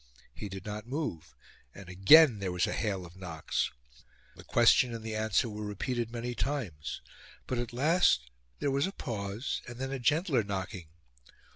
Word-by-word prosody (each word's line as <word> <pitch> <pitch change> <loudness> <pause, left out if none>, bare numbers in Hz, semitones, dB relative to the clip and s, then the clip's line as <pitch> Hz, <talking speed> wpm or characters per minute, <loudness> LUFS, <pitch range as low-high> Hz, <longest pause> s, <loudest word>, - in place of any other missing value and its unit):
He 105 - -7
did 95 -1 -8
not 105 +1 -6
move, 135 - -4 0.4
and 100 -2 -11
again 110 - +7
there 95 -2 -2
was 90 0 +1
a - - -2
hail 100 -5 -2
of 85 +1 -13
knocks. 85 -4 -2 0.7
The - - -12
question 120 +1 +4
and 115 - -7
the 110 -1 -3
answer 110 +1 +1
were 105 -1 -6
repeated 115 +3 -2
many 120 +1 -4
times; 115 - -3 0.4
but 125 - -2
at 120 -1 -3
last 125 - +3 0.3
there 140 - 0
was 140 +5 +1
a - - -4
pause, 105 - -4
and 120 0 -8
then 135 +1 -4
a 135 - -3
gentler 150 +1 +2
knocking. 95 -2 -5
110 Hz, 170 wpm, -30 LUFS, 95-130 Hz, 0.7 s, again